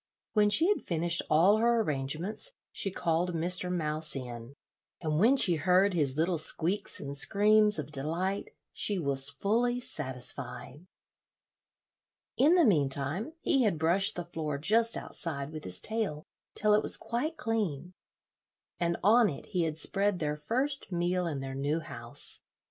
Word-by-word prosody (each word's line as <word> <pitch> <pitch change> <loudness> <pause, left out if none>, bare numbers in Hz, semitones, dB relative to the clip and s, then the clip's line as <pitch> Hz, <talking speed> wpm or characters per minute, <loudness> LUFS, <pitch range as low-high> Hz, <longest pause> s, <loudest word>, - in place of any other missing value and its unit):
When 210 -1 +3
she 320 +11 +7
had 415 - +1
finished 170 0 +2
all 175 +7 +4
her 235 +1 +2
arrangements 155 - -3 0.2
she 195 - -2
called 175 -1 -1
Mr. 180 +2 +1
Mouse 155 -3 -1
in, 120 0 -8 0.4
and 155 -2 -2
when 245 +8 +4
she 180 -9 +4
heard 185 +5 +2
his 145 -5 -1
little 165 +1 0
squeaks 180 +6 -1
and 140 0 -6
screams 210 +6 +4
of 150 -1 -6
delight, 165 +8 -2 0.2
she 205 - -1
was 140 -4 0
fully 230 - 0
satisfied. 130 - -5 1.5
In 305 +7 +4
the 345 -3 +4
mean 150 - +2
time 145 - -1
he 270 - +2
had 210 -9 +1
brushed 170 +5 +2
the 175 - -5
floor 155 -4 -4
just 225 +9 +2
outside 140 -4 -6
with 155 -1 -8
his 90 -1 -4
tail 210 - -2 0.3
till 210 0 +2
it 210 - +4
was - - +6
quite 305 +8 -4
clean, 195 - -3 0.9
and 170 0 -1
on 225 +3 +5
it 145 - -8
he 180 -4 0
had 155 -1 -4
spread 195 +5 0
their 150 -3 -2
first 255 - -2
meal 175 0 -1
in 145 -5 -4
their 135 0 -6
new 145 +4 -1
house. 115 -6 -6
175 Hz, 155 wpm, -29 LUFS, 150-210 Hz, 1.5 s, she